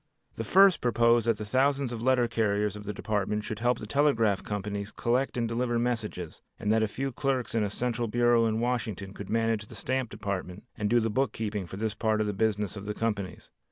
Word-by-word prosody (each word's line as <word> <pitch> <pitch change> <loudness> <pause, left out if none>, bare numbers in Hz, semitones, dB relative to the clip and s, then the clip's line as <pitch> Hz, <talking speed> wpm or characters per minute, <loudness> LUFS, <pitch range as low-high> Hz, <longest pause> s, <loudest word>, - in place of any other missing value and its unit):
The 115 - -4
first 195 - +5
proposed 115 -1 +3
that 115 -2 +3
the 105 - -5
thousands 135 +2 +1
of 115 - -5
letter 125 -1 +3
carriers 105 -3 0
of 105 0 -9
the 105 - -2
Department 105 0 -1
should 105 0 -5
help 120 +1 +2
the - - -7
telegraph 115 -6 +2
companies 105 0 -4
collect 125 +3 0
and 115 -1 0
deliver 120 +1 0
messages, 110 -8 -3 0.2
and 105 +1 +1
that 110 - +3
a 110 - +2
few 135 +6 -3
clerks 130 -1 -1
in 115 -2 +2
a 105 - 0
central 120 +2 -2
bureau 120 0 +3
at 110 - 0
Washington 110 -5 -2
could 100 0 -8
manage 115 -2 0
the - - -12
stamp 130 -2 -2
department 100 -1 -5
and 105 0 -1
do 120 +2 +4
the 115 -1 0
book 135 +5 0
keeping 105 -4 -3
for 95 - -8
this 110 0 -1
part 110 -1 0
of 110 - +1
the 105 - -1
business 105 -1 0
of 100 0 -7
the 105 0 -3
companies. 105 -5 -3
110 Hz, 225 wpm, -28 LUFS, 105-120 Hz, 0.2 s, first